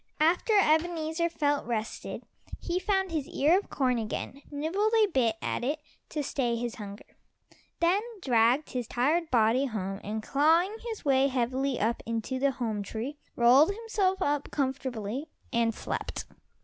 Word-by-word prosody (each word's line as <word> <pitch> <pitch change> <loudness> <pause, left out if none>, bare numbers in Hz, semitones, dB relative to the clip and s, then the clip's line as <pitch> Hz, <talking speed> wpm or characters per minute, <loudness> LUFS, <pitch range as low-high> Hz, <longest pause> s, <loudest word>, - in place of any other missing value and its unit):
After 340 +8 +3
Ebenezer 320 0 +1
felt 290 -5 0
rested, 220 -2 -4 0.4
he 355 +1 -1
found 385 -2 0
his 305 -4 -2
ear 320 +7 +3
of 405 - -11
corn 255 -3 +1
again, 225 +5 -4
nibbled 335 +10 0
a 435 - +6
bit 255 - +1
at - - -2
it 285 +5 0 0.3
to 300 -1 -2
stay 245 -4 0
his 235 0 -3
hunger, 205 -1 -8 0.8
then 355 +4 +4 0.2
dragged 245 -1 +2
his 245 -3 -3
tired 310 +8 +1
body 240 +2 +3
home, 195 -4 -4
and 215 +1 -4
clawing 325 - +3 0.2
his 440 -7 -6
way 270 -1 +4
heavily 260 +1 0
up 230 +2 0
into 230 +3 -2
the 280 +1 +3
home 230 -5 -2
tree, 230 +8 -5 0.2
rolled 250 +7 +6
himself 405 -3 0
up 290 0 0
comfortably 260 -1 -3 0.2
and 230 -1 +2
slept. - - -4
275 Hz, 150 wpm, -29 LUFS, 235-325 Hz, 0.8 s, a